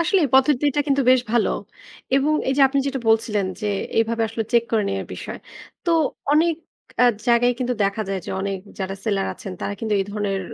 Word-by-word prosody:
আসলেই 335 -1 +3
পদ্ধতিটা 285 +1 +3
কিন্তু 280 -1 +2
বেশ 255 0 +5
ভালো। 235 -2 +3 0.6
এবং 275 +3 +3 0.2
এইযে 270 +2 +1
আপনি 280 +1 0
যেটা 275 -1 -2
বলছিলেন 220 -3 +2
যে, 210 - -2 0.3
এভাবে 230 0 +1
আসলে 225 +1 -3
চেক 235 -1 +4
করে 220 -2 +3
নেয়ার 195 0 -3
বিষয়। - - -7 0.5
তো, 345 - +1 0.4
অনেক 325 +2 +4 0.5
আ - - +7 0.2
জায়গায় 240 +1 +4
কিন্তু 250 -1 -1
দেখা 200 +2 -1
যায় 195 -1 -1
যে, - - -5
অনেক 195 0 -2 0.2
যারা 190 0 -3
সেলার 200 -3 0
আছেন, 195 - -8
তারা 200 - -3
কিন্তু 220 -1 -2
এই - - 0
ধরনের 205 -2 -2
230 Hz, 190 wpm, -22 LUFS, 205-270 Hz, 0.6 s, আ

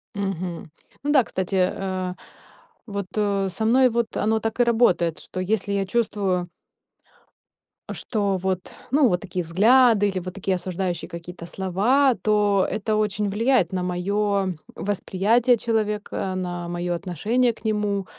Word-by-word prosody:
Мгм. 185 -5 -4 0.3
Ну 290 - 0
да, 275 -4 +5
кстати, 190 -2 -3
э, 185 0 -1 0.7
вот, 200 -2 -4
э, 200 -2 +1
со 220 +4 -3
мной 255 +3 +5
вот 235 -1 -2
оно 220 +1 +1
так 225 +2 -3
и - - +6
работает, 225 -8 +2
что 185 - -7
если 200 +1 -1
я 200 -1 0
чувствую 195 -4 -1 1.4
Что 200 -4 -1
вот, 185 0 -3 0.2
ну, 280 0 +5
вот 180 - +1
такие 185 -2 -3
взгляды 210 +4 +4
или 190 -1 -2
вот 185 0 -7
такие 195 -1 -1
осуждающие 180 -1 -3
какие-то 170 0 -8
слова, 210 +10 +2
то 205 -2 +2
это 215 0 -1
очень 210 -1 0
влияет 225 -2 +2
на 185 - -1
моё 195 +2 0 0.2
восприятие 210 +5 +2
человека, 210 -4 -2
на 175 -2 -4
моё 175 0 -2
отношение 205 - 0
к 225 - -20
нему. 210 -2 0
200 Hz, 140 wpm, -24 LUFS, 185-220 Hz, 1.4 s, и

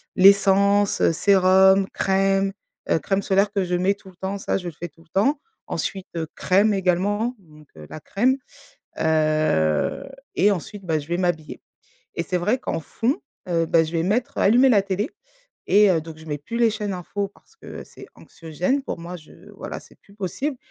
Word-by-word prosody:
L'essence, 200 +1 +4
sérum, 190 +1 +4
crème, 195 0 +1 0.4
heu, - - +3
crème 195 +6 -1
solaire 195 +1 +2
que 200 -2 0
je 180 0 -1
mets 185 +3 +2
tout 195 -1 -16
le 180 - -18
temps, 190 +2 -4
ça - - -1
je 180 - -8
le 165 - -12
fais 175 +3 -7
tout 160 +2 -23
le 165 - -32
temps. 270 - +1 0.3
Ensuite, 190 -1 -4 0.3
crème 205 +3 +2
également 200 +6 0
donc 155 -5 -19
heu, 75 - -10
la 155 - -7
crème, 250 - +1 0.6
heu 155 - +1 0.3
et 200 +4 +4
ensuite, 200 +2 -5
bah, 160 -2 0
je 145 - -10
vais 170 - -1
m'habiller 175 -4 -2 0.5
et 170 - -2
c'est 180 +2 -2
vrai 210 +8 +1
qu'en 165 - -3
fond, 235 - -2 0.3
heu, 165 -1 +1
bah, 160 0 +3
je 160 - -7
vais 165 - 0
mettre 240 +10 -1
allumer 245 +6 +5
la 210 -5 +5
télé 200 +4 -2 0.6
et 205 -1 +6
heu, 165 - +2
donc, 160 0 -10
je 160 - -13
mets 150 -1 -3
plus 190 +11 -7
les 235 -1 +4
chaînes 210 -2 -3
infos 195 +3 -4
parce 450 - -27
que - - -10
c'est - - -14
anxiogène, 180 - -3
pour 255 - -5
moi 175 +2 -7
je 155 - -16 0.2
voilà - - -7
c'est - - -20
plus 200 - -21
possible. 230 - -3
190 Hz, 190 wpm, -23 LUFS, 165-205 Hz, 0.6 s, et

